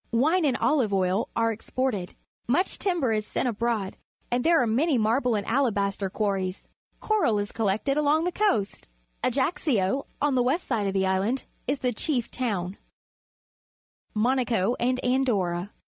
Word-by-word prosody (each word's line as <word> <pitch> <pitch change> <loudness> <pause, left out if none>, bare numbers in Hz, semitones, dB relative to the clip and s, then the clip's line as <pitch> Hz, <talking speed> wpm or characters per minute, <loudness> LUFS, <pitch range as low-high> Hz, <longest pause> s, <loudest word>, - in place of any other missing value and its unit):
Wine 310 +9 +3
and 265 -4 +2
olive 260 -9 +2
oil 190 +2 +1
are 230 0 +2
exported. 225 -3 -3 0.3
Much 330 +11 +1
timber 345 - +1
is 215 -1 0
sent - - -1
abroad, 225 -3 -1 0.3
and 245 0 +1
there 335 0 +4
are - - +2
many 270 +6 +2
marble 235 +2 +2
and 205 -1 -2
alabaster 200 -6 0
quarries. 195 -2 -2 0.4
Coral 415 - +1
is 205 0 -3
collected 225 +6 0
along 300 +2 +3
the 360 - 0
coast. 340 - 0 0.4
Ajaccio, 260 - +1
on 290 -1 +1
the 250 - +3
west 275 +9 0
side 220 -6 0
of 195 - -1
the 190 -1 +1
island, 195 +7 0 0.2
is 275 +3 +1
the 250 -1 0
chief 245 +1 -1
towni. 200 -7 -2 1.4
Monaco 235 -2 +1
and 255 +1 +1
Andorra. 205 -8 0
235 Hz, 150 wpm, -26 LUFS, 200-270 Hz, 1.4 s, there